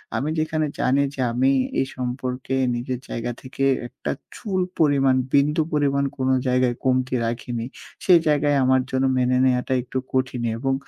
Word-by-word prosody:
আমি 145 - -1
যেখানে 155 0 0
জানি 135 +2 +2
যে 130 - -3
আমি 130 +3 +3 0.3
এই - - +2
সম্পর্কে 125 +1 -3 0.2
নিজের 125 +1 -3
জায়গা 120 +1 -3
থেকে 135 +1 -5 0.2
একটা - - -5 0.2
চুল 190 -4 -2 0.2
পরিমাণ, 140 -4 +4 0.2
বিন্দু 150 +3 +3
পরিমাণ 140 -2 +2
কোনো 130 0 +1
জায়গায় 125 -1 +2
কমতি 130 0 +1
রাখিনি। 115 0 -3 0.4
সেই 180 -3 +7
জায়গায় 145 -1 +3
আমার 130 0 +4
জন্য 130 0 +1
মেনে 125 0 +2
নেওয়াটা 125 0 +1
একটু 130 +1 -5 0.2
কঠিনই 130 -3 0
এবং 135 +1 0
130 Hz, 155 wpm, -23 LUFS, 125-140 Hz, 0.4 s, সেই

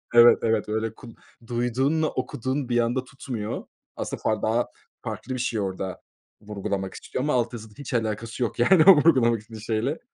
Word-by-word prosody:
Evet, 120 0 +8
evet. 110 -2 +1
Öyle, 110 +1 -1
kul 115 0 -12 0.3
duyduğunla 130 +7 +1
okuduğun 130 +1 -3
bir 120 0 +2
anda 120 +2 +1
tutmuyor. 125 -5 -5 0.3
Aslında, - - -5
far 110 -1 0
daha 115 +2 +1 0.3
farklı 130 - -5
bir 130 - -3
şey 120 -2 -1
orada 95 -1 -4 0.4
vurgulamak 100 -2 -4
istiyor 130 - -5
ama 150 - +1
alt 120 -1 +1
yazıda 110 -2 -9
hiç 145 -3 -7
alakası 115 +1 -2
yok, 120 - -3
yani, 160 +7 +6
o 195 -1 +10
vurgulamak 125 -8 +4
istediğin 110 0 -11
şeyle. 115 +7 -1
120 Hz, 170 wpm, -25 LUFS, 110-130 Hz, 0.4 s, o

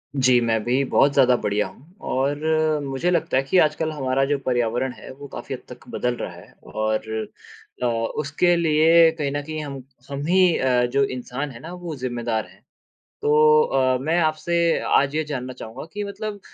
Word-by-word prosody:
जी, 130 -2 +4
मैं 110 -2 0
भी 130 +3 +1
बहुत 140 +1 +3
ज़्यादा 125 -2 +5
बढ़िया 105 0 0
हूँ। 150 - -18
और 140 +3 0 0.4
मुझे 135 +5 -1
लगता 165 -6 +1
है - - +4
कि 135 +7 +1
आजकल 155 +1 +1
हमारा 135 -3 0
जो 145 +1 0
पर्यावरण 120 +1 0
है - - -10
वो 140 +1 -10
काफ़ी - - -7
हद - - -6
तक - - -12
बदल 125 0 -1
रहा - - -5
है। - - -15 0.2
और 110 0 -1 0.8
अ, - - +2
उसके 145 +9 0
लिए 165 0 +5
कहीं 140 -2 -1
न 145 +1 -2
कहीं 155 +1 -5
हम 140 -2 -7 0.3
हम 140 +1 -4
ही 180 -1 +4
अ, 125 -1 +2
जो 135 +3 +1
इंसान 130 +2 -4
हैं 115 - -11
ना, 165 +6 -9
वो 175 -3 -6
ज़िम्मेदार 120 -4 -2
हैं। - - -21 0.6
तो 150 +1 +5
अ, 130 -2 +1
मैं 160 +6 0
आपसे 170 +1 +1
आज 140 +1 +2
ये 155 - 0
जानना 130 -4 -5
चाहूँगा 125 +1 -9
कि 205 0 -4
मतलब 205 +1 -6
140 Hz, 190 wpm, -23 LUFS, 125-155 Hz, 0.8 s, ज़्यादा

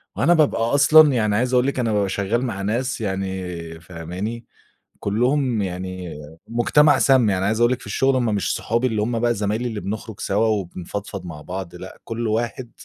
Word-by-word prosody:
وأنا 135 - +3
بابقى 155 -8 +2
أصلًا 150 +2 +7
يعني 105 -4 +1
عايز 125 +3 0
أقول 125 +2 +3
لِك 140 - -1
أنا 115 -3 0
بابقى 100 -2 +1
شغّال 105 +6 -1
مع 105 -6 -4
ناس 120 +5 -2
يعني 95 -4 -4
فاهماني، 90 +7 -6 0.6
كُلّهم 125 +2 +1
يعني 90 -1 -5 0.3
مُجتمع 140 +5 +4
سام. 125 -3 +4
يعني 95 0 0
عايز 110 +3 0
أقول 120 +1 +4
لِك 130 - -2
في - - -13
الشُغل 135 +6 +1
هم 120 -4 +1
مش 100 - 0
صحابي 115 +3 0
اللي 110 -4 0
هم 115 +1 -1
بقى 120 0 +1
زمايلي 105 +4 -1
اللي 110 -3 -5
بنخرُج 105 +1 -6
سوا 105 +3 +1
وبنفضفض 100 -1 -4
مع 80 -4 -8
بعض 90 0 -6
لأ، - - -10
كل 115 0 -3
واحد 115 +2 -2
110 Hz, 185 wpm, -22 LUFS, 95-120 Hz, 0.6 s, أصلًا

